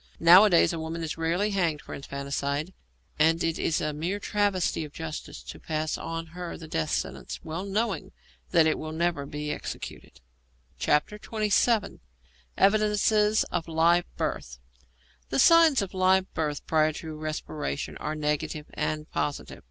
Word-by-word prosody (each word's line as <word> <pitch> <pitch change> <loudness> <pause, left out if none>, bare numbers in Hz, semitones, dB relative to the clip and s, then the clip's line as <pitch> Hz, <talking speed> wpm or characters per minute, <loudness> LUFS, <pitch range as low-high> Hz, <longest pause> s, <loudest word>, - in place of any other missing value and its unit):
Nowadays 175 +1 +7
a 165 - -3
woman 165 +1 -4
is 160 - -3
rarely 170 +6 0
hanged 170 -6 0
for - - -9
infanticide, 140 +4 -3 0.5
and 165 +2 +3
it 165 0 -1
is 160 - +1
a 150 0 -2
mere 170 +7 -2
travesty 205 -5 0
of 150 - -8
justice 160 -1 -7
to - - -9
pass 155 -1 -2
on 165 0 -5
her 180 -1 -6
the 160 - -10
death 80 - -2
sentence, - - -3
well 165 +3 -4
knowing 200 -1 -2 0.4
that 165 -3 +5
it 160 - +1
will 155 0 -5
never 165 -3 -1
be 150 +1 -4
executed. - - -7 0.6
XXVII. 210 +5 +1 0.6
EVIDENCES 210 +1 +3
OF 170 -1 -2
LIVE 165 +2 +3
BIRTH 60 0 -3 0.7
The 135 - -1
signs 325 - +6
of 195 - -7
live 185 0 +2
birth 150 -3 -2
prior 155 -1 +2
to 160 0 -7
respiration 155 -1 -4
are 155 +1 -4
negative 150 0 -2
and 155 0 -2
positive. 145 - -3
165 Hz, 145 wpm, -27 LUFS, 155-190 Hz, 0.7 s, Nowadays